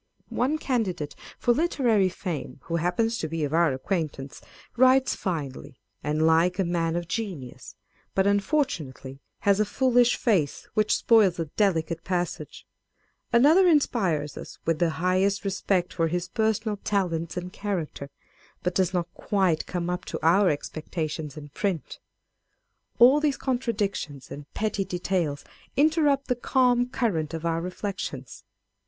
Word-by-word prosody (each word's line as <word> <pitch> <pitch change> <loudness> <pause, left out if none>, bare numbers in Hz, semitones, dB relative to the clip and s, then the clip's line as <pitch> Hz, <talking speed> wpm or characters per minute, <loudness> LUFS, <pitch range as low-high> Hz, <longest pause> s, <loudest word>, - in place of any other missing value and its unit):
One 275 +5 0
candidate 200 - -2 0.2
for 240 - +2
literary 235 - +2
fame, 170 -8 -5
who 170 0 -2
happens 225 +7 0
to 160 - -2
be 160 0 -3
of 145 +1 -2
our 165 -2 +4
acquaintance, 145 -1 -3 0.3
writes 260 +1 +4
finely, 145 -8 -5 0.2
and 150 +2 +1
like 165 +3 +3
a 195 - +2
man 170 -2 0
of 175 -1 -3
genius; 180 - -5 0.4
but 190 - +3
unfortunately 175 - -1 0.2
has 200 0 +3
a - - +5
foolish 245 +2 +3
face, 180 - 0
which 215 0 +2
spoils 210 -6 +4
a 165 - -1
delicate 170 -5 +1
passage: 180 -1 -3 0.7
â€" 235 - +5
another 320 +9 +6
inspires 190 - +1
us - - -9
with 165 -1 +1
the 170 - +3
highest 185 +4 +1
respect 190 -2 0
for 165 -2 +1
his 175 +2 -2
personal 220 -1 0
talents 175 -5 -1
and 180 0 -5
character, 175 -8 -4 0.5
but 180 - 0
does 185 0 +1
not 175 -1 0
quite 185 -6 0
come 175 -1 -3
up 180 0 -2
to - - -4
our 185 +3 +5
expectations 155 0 -4
in 145 -1 -9
print. 180 +1 -3 1.0
All 255 +5 +7
these 295 -2 +1
contra 255 -2 -1
dictions 195 - -4
and 145 0 -9
petty 210 -2 -1
details 175 -5 -2 0.3
interrupt 295 -2 +3
the 250 - +1
calm 245 0 +2
current 165 - -1
of 165 0 -6
our 165 0 0
reflections. 180 - -5
185 Hz, 145 wpm, -26 LUFS, 160-225 Hz, 1.0 s, All